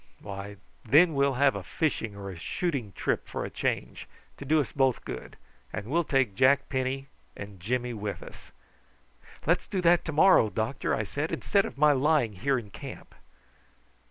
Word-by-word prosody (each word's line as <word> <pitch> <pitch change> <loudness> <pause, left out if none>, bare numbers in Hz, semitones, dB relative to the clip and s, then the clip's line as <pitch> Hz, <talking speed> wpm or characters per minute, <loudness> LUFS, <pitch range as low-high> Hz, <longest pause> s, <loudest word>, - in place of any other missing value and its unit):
Why, 100 0 -7 0.3
then 160 +8 +5
we'll 140 -1 +2
have 140 +1 +4
a - - -4
fishing 125 -10 -2
or 100 -1 -7
a - - -8
shooting 125 - -3
trip - - -1
for - - -4
a - - -7
change, - - -3 0.3
to 140 - -8
do 155 +3 +3
us 140 - -1
both 135 -3 +1
good, - - -7 0.3
and 110 - -5
we'll 165 +9 +1
take 135 -8 +1
Jack 135 +5 +3
Penny 130 0 -2 0.3
and 100 -2 -9
Jimmy 120 +6 -2
with 105 -2 -5
us." - - -13 0.9
"Let's 175 +4 +1
do 195 - -2
that 175 0 +4
to 160 - -3
morrow, 155 - +5
doctor," 110 +5 -1
I 105 - -1
said, 145 +9 -3
"instead 200 -1 +1
of - - -8
my 150 +1 +5
lying 140 -4 +2
here 135 +8 0
in 110 -4 -7
camp." - - -10
135 Hz, 180 wpm, -28 LUFS, 105-150 Hz, 0.9 s, then